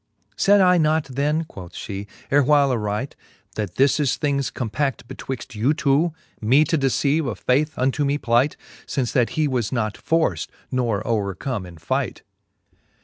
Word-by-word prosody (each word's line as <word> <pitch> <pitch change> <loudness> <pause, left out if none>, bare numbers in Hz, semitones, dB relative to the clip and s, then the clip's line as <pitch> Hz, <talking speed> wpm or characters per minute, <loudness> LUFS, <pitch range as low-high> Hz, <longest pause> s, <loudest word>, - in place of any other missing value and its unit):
Sayd 200 0 +4
I 180 -1 +5
not 155 0 +2
then, 145 +4 0
quoth 95 - -11
fhee, 100 0 -6 0.2
ervvhile 145 0 +4
aright, 110 +2 -2 0.4
That 105 -5 -4
this 135 +2 +3
is 140 -4 +2
things 140 -3 0
compa(9:e 130 +3 -2
betwixt 130 -1 -6
you 120 +8 +1
two, 150 +4 +2 0.3
Me 130 +8 +5
to 165 - 0
deceive 140 +1 +1
of 115 - -3
faith 150 +5 +1
unto 135 +3 +1
me 140 +1 +1
plight, 120 +2 +2 0.3
Since 130 -4 -1
that 120 -3 +2
he 155 -1 +3
was 125 -6 -1
not 110 -4 -1
forft, 165 0 0 0.2
nor 115 -5 0
overcome 105 0 -2
in 85 -2 -12
fight 85 - -2
135 Hz, 155 wpm, -22 LUFS, 115-150 Hz, 0.4 s, I